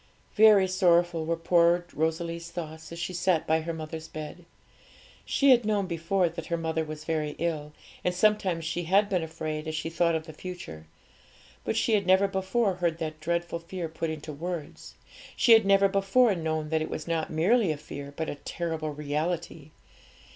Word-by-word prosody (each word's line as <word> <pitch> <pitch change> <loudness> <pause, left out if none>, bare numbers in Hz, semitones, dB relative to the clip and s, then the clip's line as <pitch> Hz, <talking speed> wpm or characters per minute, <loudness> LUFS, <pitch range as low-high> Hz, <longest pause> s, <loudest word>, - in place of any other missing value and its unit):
Very 210 -3 +6
sorrowful 175 -3 +2
were 170 - +1
poor 170 +1 +3
Rosalie's 165 +2 -2
thoughts 160 -2 -7
as 170 - -7
she 170 +2 -4
sat 180 -2 +1
by 160 +1 +2
her 165 +1 -4
mother's 160 0 -6
bed. 155 +3 -8 0.8
She 275 -1 +4
had 245 -2 +5
known 210 -2 +1
before 175 +2 0
that 165 -1 -7
her 170 - -1
mother 160 -1 -1
was 155 0 -7
very 155 -2 -2
ill, 155 -3 -2 0.3
and 180 - +2
sometimes 185 -3 +1
she 165 +1 -2
had 200 +4 +3
been 185 -3 +1
afraid 155 -1 -5
as 155 - -3
she 160 +1 -3
thought 170 0 +2
of 160 0 -3
the 160 - -10
future; 155 - -8 0.8
but 220 - -2
she 225 - +2
had 200 -3 +2
never 190 +2 +5
before 190 +1 0
heard 170 -2 0
that 155 -2 -5
dreadful 170 +1 -2
fear 170 +1 -5
put 160 +1 -4
into 155 -1 -6
words; 165 0 -6 0.4
she 235 - +3
had 225 -3 +7
never 195 0 +5
before 200 +4 +3
known 160 -3 -2
that 160 0 +1
it 155 - -3
was 155 - -5
not 165 -2 -1
merely 185 +5 +2
a 155 - -3
fear, 140 -1 -8
but 160 - -2
a - - -3
terrible 160 +1 -4
reality. 150 +1 -3
170 Hz, 185 wpm, -28 LUFS, 160-185 Hz, 0.8 s, had